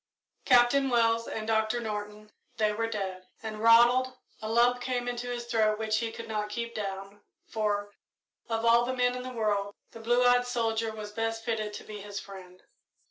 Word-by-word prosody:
Captain 255 +2 +5
Wells 230 -1 +2
and 215 - -4
Doctor 220 +1 +1
Norton 210 -1 -6 0.3
they 215 -1 +2
were 225 +2 -1
dead. 190 -4 -5 0.2
And 215 -1 -5
Ronald 240 +3 +5 0.2
a 215 - -4
lump 240 +2 +3
came 245 -1 -2
into 245 0 -3
his 240 -1 -4
throat 220 -2 +1
which 220 0 0
he 230 -1 -2
could 230 0 -8
not 210 -1 -2
keep 235 +2 -4
down, 195 0 -6 0.2
for, 205 -2 -2 0.6
of 225 0 -1
all 235 +1 +5
the 255 +2 -2
men 250 0 +2
in 250 - -4
the 255 - -6
world, 205 -4 -1 0.2
the 230 - -11
blue 240 +2 +2
eyed 245 0 +4
soldier 225 -2 -1
was 215 -1 -7
best 225 +1 -3
fitted 220 -3 -2
to - - -8
be 210 -1 -8
his 200 0 -6
friend. 185 -2 -12
225 Hz, 190 wpm, -29 LUFS, 210-240 Hz, 0.6 s, Captain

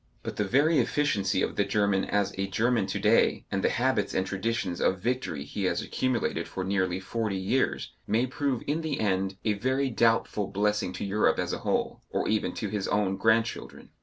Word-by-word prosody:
But - - -5
the 105 - +1
very 145 +9 +3
efficiency 100 -11 +1
of - - -2
the 100 - +4
German 100 -1 +1
as 100 -1 0
a 95 0 -2
German 110 +1 +1
to 100 - -2
day, 105 +3 +3
and 100 -1 -1
the - - +4
habits 125 -4 0
and 95 - +1
traditions 95 -2 -2
of 95 - +2
victory 115 - -2
he 95 +7 -4
has 85 -1 +1
accumulated 130 -3 -1
for 95 - -4
nearly 95 -1 0
forty 105 +1 -2
years, 100 +8 0 0.2
may 115 +4 +2
prove 130 -1 -2
in 150 +3 -1
the 155 -3 -2
end 95 -2 0
a 105 - +3
very 130 +5 0
doubtful 115 -3 +2
blessing 105 -1 0
to - - -4
Europe 100 +2 +2
as - - -1
a - - -3
whole, - - -1
or - - -1
even 110 0 0
to 105 - -3
his 100 -2 -2
own 100 -2 +1
grandchildren. 110 +3 0
105 Hz, 195 wpm, -28 LUFS, 95-120 Hz, 0.2 s, the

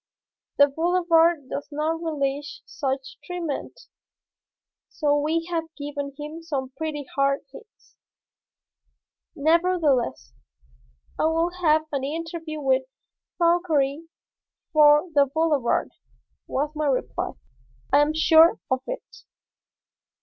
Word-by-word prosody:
The 285 - +8
Boulevard 330 0 +2
does 280 - -5
not 310 +3 -1
relish 290 -3 -3
such 270 -2 -4
treatment, 345 -5 -5 1.1
so 295 -3 +1
we 315 +3 0
have 330 -1 -1
given 285 -1 -5
him 305 +2 -7
some 275 -5 -4
pretty 310 -3 -4
hard 275 0 +2
hits." 435 +9 -17 1.4
"Nevertheless, 300 - +1 0.9
I - - +2
will 330 +2 +1
have 310 -2 +3
an 275 -2 -2
interview 320 +1 -5
with 265 -2 +1 0.5
Fauchery 330 -4 +1 0.7
for 300 +2 +6
the 285 -1 +4
Boulevard," 305 -5 +1 0.6
was 290 +2 -1
my 305 -1 -1
reply. 250 - -1 0.6
"I 285 - +7
am 300 +1 +1
sure 320 +1 +6
of 260 0 +1
it." - - -7
300 Hz, 105 wpm, -24 LUFS, 280-330 Hz, 1.4 s, The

